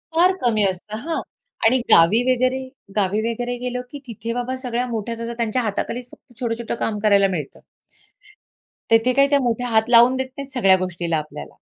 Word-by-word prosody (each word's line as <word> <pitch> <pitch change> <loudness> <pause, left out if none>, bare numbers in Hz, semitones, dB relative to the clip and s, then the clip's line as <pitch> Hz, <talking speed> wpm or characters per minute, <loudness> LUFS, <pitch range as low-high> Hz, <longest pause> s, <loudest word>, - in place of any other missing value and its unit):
फार 355 +3 +5
कमी 225 -4 +2
असतं. 195 +3 -5
हां 330 -1 -2 0.4
आणि 240 +3 +5
गावी 170 +8 +6
वगैरे 255 +1 +1 0.4
गावी 205 +2 +1
वगैरे 245 +1 -3
गेलो 250 0 -2
की 285 - -7
तिथे 230 0 -5
बाबा 250 +1 -3
सगळ्या 245 0 -1
मोठ्या 230 +1 -3 0.2
त्यांच्या 235 +1 -1
हाताखालीच 245 +4 -4
फक्त 245 - -19
छोटं-छोटं 235 -2 -3
काम 210 -2 -2
करायला 200 -1 +5
मिळतं. 145 - -8 1.3
तेथे 225 +3 +4
काय 275 - +6
ते 285 - +5
मोठे 240 0 0
हात 220 +1 +3
लावून 240 +2 +6
देत 260 0 -2
नाहीत 275 0 -7
सगळ्या 195 -7 +4
गोष्टीला 175 -3 -2
आपल्याला. 155 0 -8
235 Hz, 170 wpm, -21 LUFS, 210-250 Hz, 1.3 s, गावी